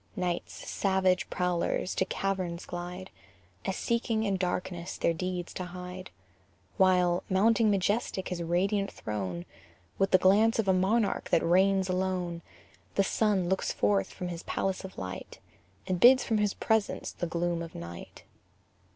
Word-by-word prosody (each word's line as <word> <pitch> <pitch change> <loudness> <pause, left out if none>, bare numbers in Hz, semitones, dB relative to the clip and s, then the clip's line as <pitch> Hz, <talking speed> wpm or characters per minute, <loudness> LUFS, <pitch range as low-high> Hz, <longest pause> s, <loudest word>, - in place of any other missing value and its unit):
Night's 180 -2 -3
savage 190 -2 +1
prowlers 180 0 -1
to - - +1
caverns 185 -3 -2
glide, 180 +2 -6 0.5
As 190 - -1
seeking 230 -1 0
in 200 -3 +1
darkness 180 -1 -3
their 170 - +1
deeds 180 +1 -4
to 185 - -4
hide; 180 +1 -8 0.7
While, 180 -2 +4
mounting 215 +3 +4
majestic 200 -1 0
his 180 -1 -3
radiant 195 +4 0
throne, 95 -5 -4 0.5
With 195 0 +3
the - - +6
glance 205 +5 +4
of 220 -3 0
a 190 - +5
monarch 200 +4 +1
who - - +3
reigns 190 +2 +3
alone, 185 -2 -1 0.5
The 195 - +4
sun 195 -2 +1
looks 190 +1 0
forth 100 -2 +1
from 180 - -5
his 170 -1 -5
palace 190 0 -2
of 190 - -9
light, 95 0 -6 0.5
And 185 -1 -1
bids 255 +4 +7
from 220 -2 0
his 210 -1 +1
presence 220 -2 0
the 175 - -4
gloom 170 0 -1
of 165 -1 -8
night. 85 0 -9
185 Hz, 150 wpm, -29 LUFS, 175-195 Hz, 0.7 s, bids